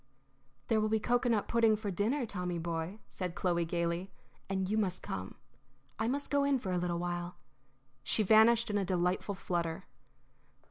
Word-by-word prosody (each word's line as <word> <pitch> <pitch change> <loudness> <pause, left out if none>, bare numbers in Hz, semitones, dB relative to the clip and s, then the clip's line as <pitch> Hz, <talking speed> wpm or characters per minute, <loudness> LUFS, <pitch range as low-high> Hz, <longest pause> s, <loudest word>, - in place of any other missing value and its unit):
"There 220 -1 +2
will 215 - +1
be 220 0 +2
cocoanut 240 -1 +1
pudding 230 -2 +4
for 210 -1 -4
dinner, 230 +9 0
Tommy, 180 -4 -3
boy," 165 +3 -3
said 180 -2 -5
Chloe, 175 -3 +1
gayly, 170 +2 -1 0.4
"and 190 -1 0
you 210 - 0
must 195 -4 0
come. 95 0 -5 0.6
I 220 - +1
must 280 +4 -2
go 285 -1 +3
in 280 -1 +3
for 200 -7 -4
a 180 - +1
little 175 -1 -1
while." 175 0 -3 0.7
She 215 - +1
vanished 220 +2 +5
in 205 - +1
a - - 0
delightful 180 +2 0
flutter. 170 -3 -2
195 Hz, 170 wpm, -32 LUFS, 175-220 Hz, 0.7 s, vanished